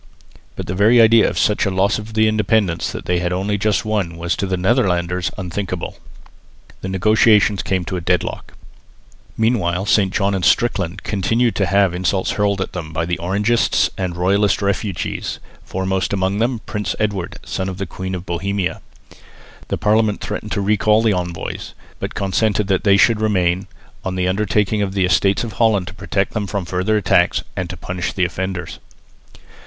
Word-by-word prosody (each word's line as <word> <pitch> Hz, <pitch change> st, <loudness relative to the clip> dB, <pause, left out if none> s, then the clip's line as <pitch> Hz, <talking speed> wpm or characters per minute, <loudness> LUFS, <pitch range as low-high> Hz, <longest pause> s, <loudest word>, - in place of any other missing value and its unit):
But -, -, -5 dB
the 90 Hz, -, -3 dB
very 110 Hz, +6 st, +4 dB
idea 115 Hz, 0 st, +6 dB
of -, -, -6 dB
such 105 Hz, -, +2 dB
a 100 Hz, -, +1 dB
loss 95 Hz, +3 st, +1 dB
of 110 Hz, +1 st, -9 dB
the 110 Hz, 0 st, +4 dB
independence 105 Hz, -5 st, +1 dB
that -, -, -7 dB
they 90 Hz, 0 st, +1 dB
had 90 Hz, 0 st, -1 dB
only 95 Hz, +3 st, -1 dB
just 105 Hz, +1 st, 0 dB
won 100 Hz, -6 st, -1 dB
was 85 Hz, +1 st, -1 dB
to 100 Hz, -, -1 dB
the 95 Hz, -1 st, -1 dB
Netherlanders 90 Hz, -4 st, +1 dB
unthinkable. 90 Hz, -1 st, -4 dB, 0.8 s
The 95 Hz, -, -4 dB
negotiations 105 Hz, +1 st, +3 dB
came 95 Hz, -2 st, -1 dB
to 90 Hz, -, -3 dB
a -, -, -4 dB
deadlock. 90 Hz, +1 st, -2 dB, 0.8 s
Meanwhile 100 Hz, -5 st, +1 dB
St 100 Hz, -3 st, +3 dB
John 100 Hz, 0 st, +1 dB
and 95 Hz, -2 st, -2 dB
Strickland 95 Hz, -6 st, +1 dB
continued 115 Hz, +4 st, +1 dB
to 100 Hz, -, +1 dB
have 100 Hz, -2 st, +3 dB
insults 95 Hz, +1 st, 0 dB
hurled 100 Hz, -1 st, 0 dB
at -, -, -4 dB
them 80 Hz, -3 st, -6 dB
by 80 Hz, +1 st, -1 dB
Orangists 105 Hz, +7 st, +1 dB
and 90 Hz, -2 st, -3 dB
royalist 100 Hz, +4 st, +2 dB
refugees, 100 Hz, -2 st, -2 dB, 0.3 s
foremost 95 Hz, +1 st, -2 dB
amongst 95 Hz, +1 st, 0 dB
them 120 Hz, +1 st, 0 dB
Prince 105 Hz, -1 st, -3 dB
Edward, 100 Hz, -5 st, -2 dB
son 95 Hz, 0 st, -3 dB
of 95 Hz, -, -6 dB
the 100 Hz, -, -3 dB
Queen 95 Hz, +2 st, -5 dB
of 90 Hz, 0 st, -7 dB
Bohemia. 100 Hz, +1 st, -2 dB, 0.9 s
The -, -, -2 dB
Parliament 105 Hz, 0 st, +2 dB
threatened 105 Hz, -, -5 dB
to 100 Hz, -, -1 dB
recall 105 Hz, +2 st, +3 dB
the 110 Hz, -2 st, +3 dB
envoys, 90 Hz, -2 st, -4 dB, 0.2 s
but -, -, -5 dB
consented 105 Hz, +1 st, +1 dB
that 95 Hz, +1 st, +1 dB
they 100 Hz, -1 st, +5 dB
should 110 Hz, +2 st, +4 dB
remain, 95 Hz, -3 st, +1 dB, 0.4 s
on 95 Hz, -1 st, -3 dB
the 90 Hz, 0 st, 0 dB
undertaking 105 Hz, +2 st, +1 dB
of 100 Hz, -1 st, -2 dB
the 95 Hz, -2 st, +2 dB
Estates 95 Hz, +3 st, +2 dB
of 115 Hz, -3 st, -5 dB
Holland 105 Hz, -4 st, +2 dB
to -, -, -11 dB
protect 95 Hz, 0 st, -2 dB
them 105 Hz, -2 st, -2 dB
from 100 Hz, -2 st, -3 dB
further 95 Hz, +5 st, 0 dB
attacks, 90 Hz, -3 st, +2 dB
and -, -, -3 dB
to -, -, -6 dB
punish 90 Hz, -1 st, -4 dB
the 95 Hz, -, +1 dB
offenders. 90 Hz, 0 st, -4 dB
95 Hz, 180 wpm, -19 LUFS, 90-105 Hz, 0.9 s, idea